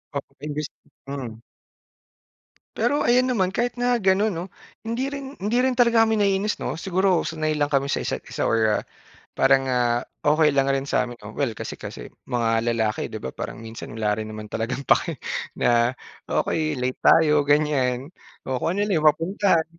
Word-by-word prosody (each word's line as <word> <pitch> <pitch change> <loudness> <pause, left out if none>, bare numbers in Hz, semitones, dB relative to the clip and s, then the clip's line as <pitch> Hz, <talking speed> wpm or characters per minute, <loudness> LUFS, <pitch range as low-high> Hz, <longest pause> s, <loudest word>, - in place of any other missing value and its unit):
oo 140 - -4
imbis 150 0 -3 0.4
hmm. 125 -5 -6 1.3
Pero 290 - +1
ayun 250 +2 +4
naman 190 -5 +1
kahit 245 +2 -1
na 245 0 +2
ganun 195 +2 +3
'no, 170 +2 -4 0.4
hindi 235 +4 -2
rin 275 0 -7
hindi 210 +5 0
rin 260 -1 +1
talaga 235 -2 +5
kami 220 -1 +1
naiinis 200 +1 +1
'no, - - -3
siguro 185 +1 +1
sanay 155 -1 -1
lang 145 -1 0
kami 140 0 +2
sa - - -1
isa't-isa - - -3
or 110 -2 +2 0.6
parang, 135 0 +4
ah, 120 -1 +1 0.2
okey 155 +1 +5
lang 135 -1 +2
rin 135 0 +1
sa'min 125 -3 -1
oh 105 - -8
well 115 0 -2
kasi - - -6
kasi - - -8 0.2
mga 115 -1 0
lalaki 110 -2 0
di - - -8
ba 65 - -4
parang 110 - -7
minsan 115 -1 -8
wala 105 -1 0
rin 110 - -4
naman 105 0 -8
talagang 120 +5 -3
pake - - +2 0.4
na, 120 +1 +3 0.3
okey 155 -2 0
late 125 +1 -2
tayo 150 -3 +4
ganyan 145 -2 +1 0.4
o 130 -1 -1
kung 165 +7 -1
ano 205 - 0
lang 210 - 0
yung 155 - +1
mapuntahan. 165 0 +1
150 Hz, 175 wpm, -24 LUFS, 125-195 Hz, 1.3 s, talaga